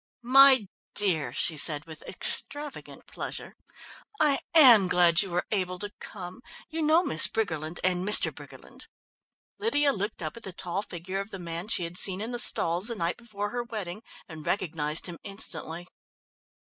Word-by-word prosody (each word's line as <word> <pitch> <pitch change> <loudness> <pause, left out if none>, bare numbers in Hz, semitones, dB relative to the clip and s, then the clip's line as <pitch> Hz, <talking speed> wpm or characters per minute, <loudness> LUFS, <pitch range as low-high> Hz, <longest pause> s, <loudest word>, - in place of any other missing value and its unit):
"My 270 -5 +6 0.3
dear," 165 -11 +2
she 155 +5 -1
said 150 0 +4
with 160 -1 -12
extravagant 290 -1 0
pleasure, - - -8 0.6
"I 295 -3 +2 0.2
am 240 - +7
glad 175 -2 +3
you 195 - -4
were 175 0 -3
able 185 -3 -2
to 205 +2 -6
come. 185 +2 -10 0.3
You 325 +1 -4
know 315 +3 +2
Miss 155 - +5
Briggerland 160 -6 -4
and 180 -1 0
Mr. 210 +2 +4
Briggerland?" - - -14 0.7
Lydia 295 -10 0
looked 205 -2 -5
up 155 - -5
at - - -11
the 190 -4 -9
tall 180 +2 -5
figure 185 0 -7
of 200 +2 -7
the 195 - -8
man 170 +1 -7
she 195 - +3
had 170 +1 -6
seen 190 0 +5
in 220 +3 -6
the 240 - -5
stalls 175 -3 +1
the 235 - -3
night 170 -3 -3
before 205 -3 -7
her 245 - -3
wedding 215 -5 -7 0.3
and 160 -3 -11
recognised 155 -4 -2
him 175 -2 -6
instantly. 175 -3 -2
190 Hz, 170 wpm, -26 LUFS, 170-225 Hz, 0.7 s, am